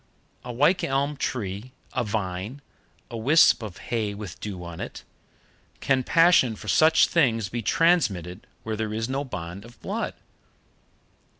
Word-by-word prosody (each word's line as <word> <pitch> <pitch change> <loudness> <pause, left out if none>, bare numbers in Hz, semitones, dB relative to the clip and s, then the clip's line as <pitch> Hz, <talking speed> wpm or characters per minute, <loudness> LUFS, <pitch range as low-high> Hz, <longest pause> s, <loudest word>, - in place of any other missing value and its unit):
A 125 - -6
wych 150 +9 +2
elm 140 +2 0
tree, 115 -2 -4 0.2
a 125 - 0
vine, 105 +4 -4 0.5
a 115 - -4
wisp 140 +4 +5
of 105 -5 -7
hay 110 -4 -3
with 100 -4 -8
dew 95 -4 -6
on 85 -1 -8
it - - -7 0.8
can 135 -2 +2
passion 165 -7 +4
for 105 - -11
such 160 +7 +5
things 115 - +1
be 120 +3 -3
transmitted 105 - +1 0.2
where 110 -1 -3
there 110 0 -3
is 115 +1 -2
no 135 +2 -2
bond 95 -7 -7
of 120 +1 -15
blood? - - -3
115 Hz, 145 wpm, -25 LUFS, 100-135 Hz, 0.8 s, wisp